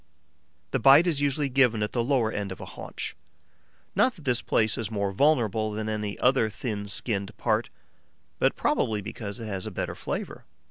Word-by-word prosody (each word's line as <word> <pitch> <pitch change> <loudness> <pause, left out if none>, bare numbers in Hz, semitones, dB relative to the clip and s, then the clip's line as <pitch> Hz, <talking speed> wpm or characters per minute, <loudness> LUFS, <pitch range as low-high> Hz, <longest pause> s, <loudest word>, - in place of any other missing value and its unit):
The - - +1
bite 140 +5 +7
is 160 -5 0
usually 145 0 +1
given 125 -5 +3
at 105 - -2
the 120 - 0
lower 120 -4 +1
end 100 -3 -3
of 95 - -7
a - - -7
haunch: - - -7 0.8
not 255 - +3
that 165 - -14
this 125 -2 +2
place 110 0 +2
is 110 -3 -3
more 100 -3 -1
vulnerable 110 -4 +2
than 110 +1 -3
any 105 -1 -3
other 125 -3 +3
thin 105 -2 -4
skinned 100 -1 -1
part, 110 0 0 0.7
but - - +3
probably 105 -2 0
because 105 0 -6
it 115 - -6
has 100 -3 -4
a - - -2
better - - -3
flavour. - - -5
110 Hz, 185 wpm, -27 LUFS, 105-130 Hz, 0.8 s, bite